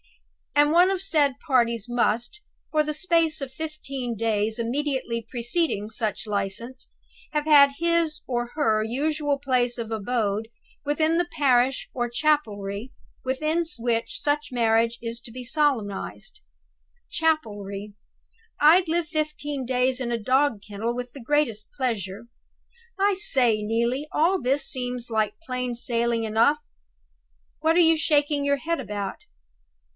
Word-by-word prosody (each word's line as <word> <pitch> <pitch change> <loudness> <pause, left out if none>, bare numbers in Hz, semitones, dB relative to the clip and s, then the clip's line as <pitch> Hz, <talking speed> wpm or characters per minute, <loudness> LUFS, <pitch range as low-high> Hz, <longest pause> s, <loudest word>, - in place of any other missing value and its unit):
'And 295 +1 +5
one 350 +3 +6
of 385 - +1
the - - -8
said 285 -7 +2
parties 235 -6 +2
must, 240 - 0 0.3
for 305 -1 +3
the 305 0 -3
space 330 -1 +1
of 275 -2 -5
fifteen 275 -5 -5
days 220 0 0
immediately 240 -1 -2
preceding 240 -2 0
such 215 -2 -2
license, 210 +5 -4 0.4
have 300 -1 0
had 285 -2 +7
his 335 -2 +1
or 240 -1 -1
her 220 -8 +2
usual 290 +5 -1
place 250 -3 0
of 230 -1 -5
abode 220 -1 -1 0.4
within 310 +3 +2
the 350 0 +1
parish 260 -2 +3
or 240 -1 -1
chapelry 235 -6 -1 0.3
within 310 +6 0
which 230 -1 -1
such 295 0 -1
marriage 230 -1 +2
is 230 0 -4
to 235 - -12
be 250 +2 -7
solemnized!' 255 - -1 0.7
Chapelry! 210 - -1 0.7
I'd 335 +5 +6
live 330 0 0
fifteen 300 -3 -3
days 255 +1 +1
in 240 -1 -2
a 235 - +1
dog 255 0 +1
kennel 220 +3 -3
with 245 0 -5
the 275 - -10
greatest 235 -5 0
pleasure. 225 -6 -3 0.7
I 400 +1 +4
say, 250 - +3
Neelie, 235 +6 -1
all 350 +4 +2
this 270 +3 +1
seems 250 -2 -4
like 215 -1 0
plain 250 -5 -3
sailing 235 -1 0
enough. 225 +7 +3 1.0
What 320 +1 +2
are - - +5
you 330 -1 +6
shaking 290 -2 +2
your 280 0 +2
head 330 +3 -2
about? 205 -2 -5
255 Hz, 140 wpm, -25 LUFS, 230-300 Hz, 1.0 s, had